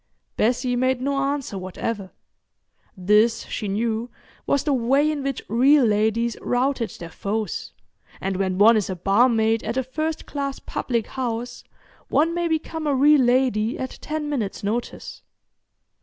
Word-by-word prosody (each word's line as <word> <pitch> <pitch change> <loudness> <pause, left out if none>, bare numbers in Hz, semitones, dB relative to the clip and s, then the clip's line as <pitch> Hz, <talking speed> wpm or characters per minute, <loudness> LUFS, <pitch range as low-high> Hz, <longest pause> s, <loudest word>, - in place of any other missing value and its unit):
Bessie 245 +2 +1
made 255 +1 +1
no 280 +2 -1
answer 275 -7 -2
whatever. 190 +2 -4 0.9
This, 210 +5 +3
she 210 - -4
knew, 225 +3 -1 0.4
was 280 - +2
the 295 - +1
way 270 +5 +2
in 300 -2 -3
which 275 -2 -3
real 260 +5 +4
ladies 220 +2 +1
routed 250 -1 0
their 170 -1 -8
foes, 210 +5 -3 0.5
and 190 0 -2
when 190 -1 -1
one 220 +4 +7
is 210 -3 0
a 185 - -2
barmaid 220 +4 +2
at 230 +4 -3
a 260 - +1
first 310 +5 -3
class 280 -1 -4
public 235 -3 -2
house 240 -1 -4 0.4
one 330 +3 +2
may 345 0 0
become 320 -1 -2
a 285 - +2
real 290 +2 +5
lady 245 -3 +2
at 260 - -6
ten 305 0 -3
minutes' 225 -8 -3
notice. 225 +4 -4
245 Hz, 150 wpm, -23 LUFS, 215-275 Hz, 0.9 s, one